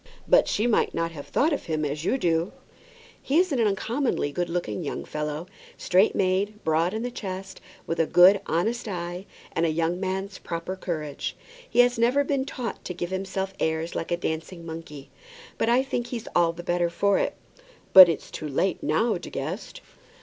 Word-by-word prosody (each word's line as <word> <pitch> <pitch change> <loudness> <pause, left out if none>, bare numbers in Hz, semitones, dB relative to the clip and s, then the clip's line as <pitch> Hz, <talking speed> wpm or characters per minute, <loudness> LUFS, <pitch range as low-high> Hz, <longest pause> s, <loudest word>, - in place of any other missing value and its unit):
"But - - +5
she 215 - 0
might 240 -3 +2
not 165 0 -1
have 145 -3 -9
thought 310 +3 +2
of 285 - -3
him 155 -2 -1
as 150 +1 -3
you 255 - +1
do." 170 -5 0 0.7
"He 280 - +1
is 365 0 +3
an 270 - 0
uncommonly 225 - 0
good 175 +4 -2
looking 175 +1 -3
young 145 - -4
fellow; 150 +1 -4 0.3
straight 190 +4 +3
made, 200 +3 0
broad 165 +5 +1
in 220 - -2
the 245 - -3
chest, 190 -3 -6 0.2
with 165 0 -3
a 165 - +3
good, 190 +3 +7
honest 220 +9 -1
eye, 175 0 -5 0.2
and 165 - -1
a 165 - +3
young 165 +2 0
man's 190 +1 -3
proper 170 +2 -4
courage. 155 -6 -4 0.3
He 245 - +5
has 245 -1 +2
never 250 +5 +3
been 275 -1 -1
taught 250 -3 -5
to 180 - -5
give 175 +1 -4
himself 190 0 -3
airs 160 +1 -1
like - - -4
a 175 - 0
dancing 165 +1 -4
monkey; 160 -4 -9 0.5
but 225 - +2
I 245 +2 +4
think 245 -3 -3
he's 235 -3 -6
all 170 -1 +4
the 175 +1 -9
better 175 0 +1
for 200 +3 +2
that." - - -1 0.6
"But 185 -2 +12
it's 165 - -3
too 155 - -5
late 165 +6 0
now, 180 +6 +1
De - - -8
Guest." 160 - -5
180 Hz, 195 wpm, -26 LUFS, 165-215 Hz, 0.7 s, But